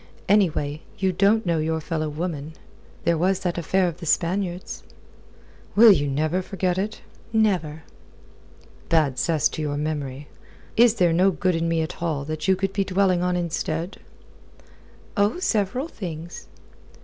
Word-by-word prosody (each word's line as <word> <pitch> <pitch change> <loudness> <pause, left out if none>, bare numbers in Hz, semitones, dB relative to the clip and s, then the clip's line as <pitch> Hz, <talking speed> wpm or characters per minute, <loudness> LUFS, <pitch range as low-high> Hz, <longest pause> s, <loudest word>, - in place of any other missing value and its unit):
Anyway, 160 -7 +2 0.2
you 190 -2 +1
don't 205 +4 +3
know 170 -2 +1
your 160 +1 0
fellow 155 -1 -3
woman. 155 -1 -4 0.5
There 170 -2 +2
was 190 +2 +1
that 175 -1 -1
affair 185 +3 +1
of 170 -1 -4
the 170 - -7
Spaniards." 180 +2 -1 0.9
"Will 225 +1 +9
ye 145 -6 +3
never 155 +6 0
forget 185 -1 -1
it?" 210 +2 -3 0.3
"Never." 180 -9 +1 1.1
"Bad 155 -6 +2
cess 160 -3 +2
to - - -5
your 145 -1 -2
memory. 145 -2 -4 0.5
Is 235 0 +5
there 175 -5 +3
no 185 +3 +4
good 185 0 0
in 165 0 0
me 165 -1 +1
at 160 - -7
all 155 -5 -1
that 155 +3 -4
you 190 - +5
could 195 +1 -2
be 200 - +1
dwelling 185 -2 +2
on 180 0 +1
instead?" 170 0 -2 1.2
"Oh, 205 +6 +2
several 250 - 0
things." 170 - -7
175 Hz, 150 wpm, -24 LUFS, 155-195 Hz, 1.2 s, Will